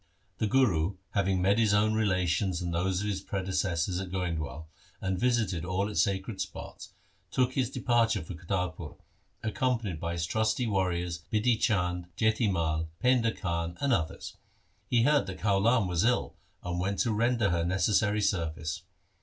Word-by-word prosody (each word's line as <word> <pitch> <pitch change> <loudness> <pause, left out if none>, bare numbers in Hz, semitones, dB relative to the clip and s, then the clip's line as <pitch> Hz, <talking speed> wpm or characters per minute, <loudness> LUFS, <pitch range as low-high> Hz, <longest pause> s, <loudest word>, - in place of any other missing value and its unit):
The 110 - +1
Guru 100 -8 +2 0.2
having 95 -2 +1
met 100 +3 +3
his 105 -3 +4
own 110 +1 +3
relations 95 -3 +1
and 85 -1 -3
those 90 +2 0
of - - -2
his 95 -2 -2
predecessors 90 -2 -1
at 95 -1 -5
Goindwal, 80 -5 -3 0.3
and 95 -2 -2
visited 115 -8 +1
all 95 +3 -1
its 105 -7 +1
sacred 95 +3 -1
spots, 105 0 -7 0.4
took 130 +5 +1
his 130 -3 0
departure 120 -8 +1
for 80 - -7
Kartarpur, 90 -2 -3 0.5
accompanied 110 -5 -1
by 85 +1 -3
his 85 -1 -1
trusty 110 +6 0
warriors 90 -4 -1
Bidhi 110 +3 +3
Chand, 90 -4 +1
Jati 110 -1 +2
Mai, 80 -3 0 0.2
Painda 125 -3 +4
Khan, 85 -1 -2
and 140 -2 +2
others. 80 -7 -3 0.5
He 120 -2 +3
heard 145 +2 +3
that 95 - -5
Kaulan 105 +2 +3
was 90 -2 +1
ill, 120 +1 +1 0.3
and 90 0 -3
went 100 +2 -1
to 120 - +1
render 115 -2 +2
her 85 -1 +1
necessary 105 +4 +2
service. 80 -5 -1
95 Hz, 160 wpm, -29 LUFS, 85-110 Hz, 0.5 s, his